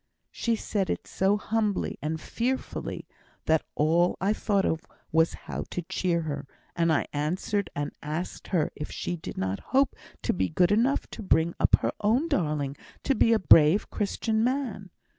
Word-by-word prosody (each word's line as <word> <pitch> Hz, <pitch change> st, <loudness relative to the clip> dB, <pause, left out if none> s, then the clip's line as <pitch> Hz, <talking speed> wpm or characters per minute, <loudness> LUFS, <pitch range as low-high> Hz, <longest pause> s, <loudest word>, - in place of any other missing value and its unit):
She 230 Hz, -1 st, 0 dB
said 205 Hz, -3 st, -2 dB
it -, -, -2 dB
so 195 Hz, +2 st, +1 dB
humbly 210 Hz, -1 st, -1 dB
and 160 Hz, +2 st, -2 dB
fearfully 250 Hz, +9 st, -3 dB, 0.4 s
that 160 Hz, -1 st, +3 dB
all 165 Hz, +4 st, +3 dB
I 200 Hz, +3 st, +2 dB
thought 200 Hz, -2 st, +1 dB
of 160 Hz, -, 0 dB, 0.3 s
was 160 Hz, +1 st, +3 dB
how -, -, -4 dB
to 175 Hz, -, -4 dB
cheer 170 Hz, 0 st, 0 dB
her, 145 Hz, -3 st, -4 dB, 0.3 s
and 165 Hz, -1 st, +2 dB
I 155 Hz, -, +2 dB
answered 180 Hz, +7 st, -1 dB
and 145 Hz, 0 st, -3 dB
asked 155 Hz, +4 st, -4 dB
her 170 Hz, -5 st, +1 dB
if 150 Hz, -, -6 dB
she 175 Hz, -, -3 dB
did 165 Hz, -, -8 dB
not 95 Hz, +1 st, -1 dB
hope 270 Hz, +1 st, +1 dB, 0.3 s
to -, -, +1 dB
be 95 Hz, 0 st, 0 dB
good 180 Hz, 0 st, +3 dB
enough 235 Hz, +7 st, +2 dB
to -, -, -7 dB
bring 170 Hz, -4 st, +2 dB
up -, -, +5 dB
her -, -, +1 dB
own 235 Hz, +10 st, +2 dB
darling 150 Hz, -, 0 dB, 0.3 s
to 275 Hz, -, +2 dB
be 230 Hz, -, +3 dB
a 225 Hz, -, +5 dB
brave 165 Hz, -1 st, +5 dB
Christian 220 Hz, +2 st, 0 dB
man? 245 Hz, -7 st, -1 dB
180 Hz, 175 wpm, -27 LUFS, 155-215 Hz, 0.4 s, up